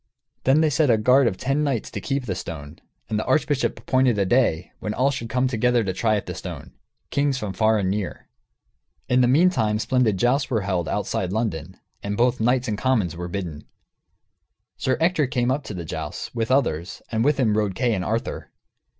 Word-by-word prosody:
Then 135 +4 +5
they 155 -1 +3
set 150 -1 +2
a 115 - +5
guard 125 +4 +4
of 95 - -1
ten 135 +6 0
knights 135 -7 -1
to - - -5
keep 135 -2 -2
the 95 - -2
stone, 80 -3 -7 0.3
and 110 - -1
the - - -3
archbishop 145 -3 +1
appointed 130 -3 +2
a 100 - +2
day 95 -7 +1
when 105 0 -4
all 135 +3 +2
should 120 -4 -5
come 130 +1 +1
together 125 -1 +2
to 95 -2 -2
try 110 +3 +1
at 100 - -2
the - - -5
stone, - - -8 0.4
kings 140 -1 +1
from 105 -5 -4
far 110 +3 +3
and 95 -2 0
near. 100 -2 -4 0.8
In 125 +1 +3
the 125 - +4
meantime, 130 -7 +3
splendid 110 -2 +1
jousts 130 +6 +1
were 115 -5 +1
held, 95 -4 -1
outside 90 -1 -2
London, 105 -8 -3 0.2
and 100 0 -3
both 125 +1 +2
knights 125 +2 +2
and 105 -1 -2
commons 110 -11 +1
were 90 +1 -5
bidden. 85 -5 -5 1.1
Sir 130 -1 0
Ector 160 -3 +2
came 125 0 0
up 140 +2 -1
to 105 - -6
the 85 -2 -5
jousts, - - -5
with 115 -1 -2
others, 95 - 0
and 110 -1 +1
with 145 +1 +2
him 110 -5 +2
rode 105 -3 0
Kay 120 +1 +1
and 95 -3 -1
Arthur. 115 +5 -3
115 Hz, 205 wpm, -23 LUFS, 100-130 Hz, 1.1 s, Then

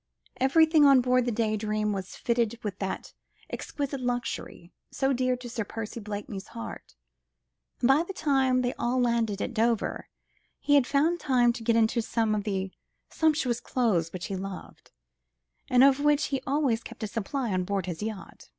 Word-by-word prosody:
Everything 310 +4 +4
on 275 -2 +7
board 250 0 +2
the 245 - 0
Day 220 -1 0
Dream 215 0 -1
was 190 -2 -5
fitted 235 -1 0
with 205 -2 -4
that 195 -1 -4 0.4
exquisite 280 -2 -4
luxury, 245 -7 -4 0.2
so 270 0 0
dear 255 0 +1
to 245 0 -9
Sir 230 -1 -3
Percy 225 +2 -6
Blakeney's 205 -2 -6
heart, 115 - -9 0.9
and 240 - +4
by 270 +4 +5
the 345 - -5
time 265 -7 +2
they 245 - 0
all 245 +2 0
landed 235 -4 +1
at 250 - -4
Dover 230 -1 0 0.5
he 290 - +1
had 280 -3 +5
found 315 +5 +2
time 245 -5 +3
to 235 - -8
get 230 0 +2
into 230 +1 +3
some 225 -1 0
of 210 -1 -2
the 190 -2 -2 0.4
sumptuous 300 -7 +1
clothes 205 -12 0
which 185 -1 -6
he 195 - -4
loved, 190 0 -8 0.8
and 250 +1 +5
of 275 0 +5
which 295 +1 +2
he 270 -2 -1
always 270 -5 +1
kept - - -10
a - - -1
supply 230 +2 -3
on 185 0 0
board 195 -1 -2
his 175 -1 -5
yacht. 215 -2 -7
235 Hz, 180 wpm, -27 LUFS, 210-265 Hz, 0.9 s, on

